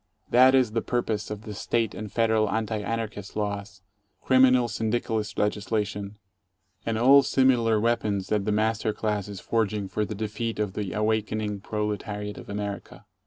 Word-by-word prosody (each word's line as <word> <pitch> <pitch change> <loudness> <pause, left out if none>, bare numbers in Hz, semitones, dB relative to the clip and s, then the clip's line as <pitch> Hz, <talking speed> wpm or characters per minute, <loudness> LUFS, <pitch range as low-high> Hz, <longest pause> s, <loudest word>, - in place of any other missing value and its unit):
That 130 +2 +7
is 130 -4 +3
the 115 +1 0
purpose 115 -4 -2
of 105 0 -6
the 105 -1 -7
State 115 +2 -1
and 105 -2 -7
Federal 110 -2 +2
Anti 110 -1 -1
Anarchist 110 -2 -4
laws, 100 -1 -4 0.4
criminal 130 -2 +4
syndicalist 110 -1 -2
legislation, 105 -1 -1 0.7
and 115 -1 0
all 135 +5 +7
21 - - -6
similar 120 -4 +3
weapons 105 -4 0
that 105 -2 0
the 105 - +1
master 110 +1 +1
class 105 -2 -2
is 100 -2 -7
forging 105 -1 -1
for 105 +3 -1
the 105 +1 -4
defeat 110 +2 -3
of 105 -3 -2
the 100 -3 -4
awakening 105 -1 -1
proletariat 105 0 -4
of - - -12
America. 100 0 -5
110 Hz, 160 wpm, -26 LUFS, 105-115 Hz, 0.7 s, That